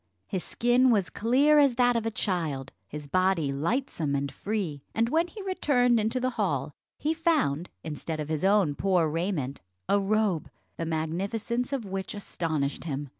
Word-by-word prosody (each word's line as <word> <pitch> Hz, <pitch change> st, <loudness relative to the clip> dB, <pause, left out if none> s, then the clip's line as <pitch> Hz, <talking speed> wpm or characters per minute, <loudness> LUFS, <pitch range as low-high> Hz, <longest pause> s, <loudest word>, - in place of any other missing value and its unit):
His 190 Hz, -4 st, -3 dB
skin 245 Hz, +2 st, +3 dB
was 205 Hz, -7 st, +2 dB
clear 275 Hz, +7 st, +4 dB
as 280 Hz, -4 st, +4 dB
that 245 Hz, 0 st, +4 dB
of 225 Hz, -1 st, 0 dB
a -, -, +2 dB
child, 160 Hz, -11 st, -2 dB, 0.2 s
his 150 Hz, +6 st, -7 dB
body 185 Hz, -1 st, +1 dB
lightsome 165 Hz, -, -1 dB
and 140 Hz, 0 st, -1 dB
free; 180 Hz, -3 st, -3 dB
and 230 Hz, +1 st, +2 dB
when 330 Hz, +5 st, +2 dB
he 410 Hz, +3 st, -9 dB
returned 250 Hz, -11 st, +2 dB
into 220 Hz, +4 st, 0 dB
the 255 Hz, +1 st, 0 dB
hall, 145 Hz, -6 st, -1 dB, 0.2 s
he 310 Hz, +2 st, 0 dB
found, 300 Hz, -, +1 dB
instead 155 Hz, 0 st, -4 dB
of 150 Hz, -, -3 dB
his 155 Hz, 0 st, -2 dB
own 195 Hz, -6 st, +4 dB
poor 180 Hz, +1 st, +2 dB
raiment, 155 Hz, -4 st, -2 dB, 0.3 s
a 200 Hz, -, +3 dB
robe, 200 Hz, -4 st, +1 dB, 0.3 s
the 165 Hz, -, -3 dB
magnificence 200 Hz, -, -2 dB
of 270 Hz, -5 st, -2 dB
which 190 Hz, 0 st, -4 dB
astonished 160 Hz, -8 st, -2 dB
him. 145 Hz, -2 st, -3 dB
195 Hz, 170 wpm, -28 LUFS, 155-240 Hz, 0.3 s, clear